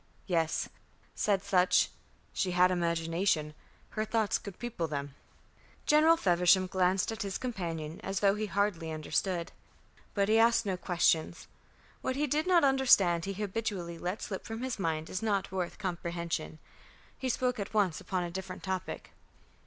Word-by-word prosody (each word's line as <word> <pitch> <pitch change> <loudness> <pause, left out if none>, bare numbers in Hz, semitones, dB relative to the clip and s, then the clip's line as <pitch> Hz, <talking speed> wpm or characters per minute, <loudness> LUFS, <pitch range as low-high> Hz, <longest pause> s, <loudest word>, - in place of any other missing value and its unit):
"Yes," 165 -3 0 0.5
said 200 -2 +1
Sutch. 180 -2 +3 0.4
"She 180 -2 -1
had 180 +1 +5
imagination. 170 -2 0 0.4
Her 215 - -2
thoughts 220 -1 0
could 200 -3 -9
people 240 -9 -3
them." 140 -2 -4 0.7
General 315 +2 +5
Feversham 180 - +4
glanced 185 +2 +1
at 225 - -5
his 195 -2 -2
companion 170 -10 -4
as 195 0 -2
though 200 -1 +4
he 210 +1 -2
hardly 190 -4 -1
understood. 170 +3 -1 0.6
But 200 -1 +2
he 220 +1 +4
asked 230 0 +4
no 190 -2 0
questions. 175 -3 +1 0.6
What 260 - -1
he 295 +2 +1
did 300 +4 0
not 355 -3 +5
understand 245 -11 +4
he 195 - -3
habitually 195 -4 -3
let 180 +4 -3
slip 190 - -5
from 225 +1 -6
his 260 -4 -3
mind 160 -3 -1
as 185 - -2
not 200 -4 0
worth 185 -2 -3
comprehension. 170 -4 -3 0.6
He 260 - -2
spoke 250 -1 0
at 200 - -4
once 190 -6 +2
upon 185 -2 -2
a 175 - -4
different 190 +1 -6
topic. 190 -1 -4
190 Hz, 155 wpm, -31 LUFS, 170-215 Hz, 0.7 s, had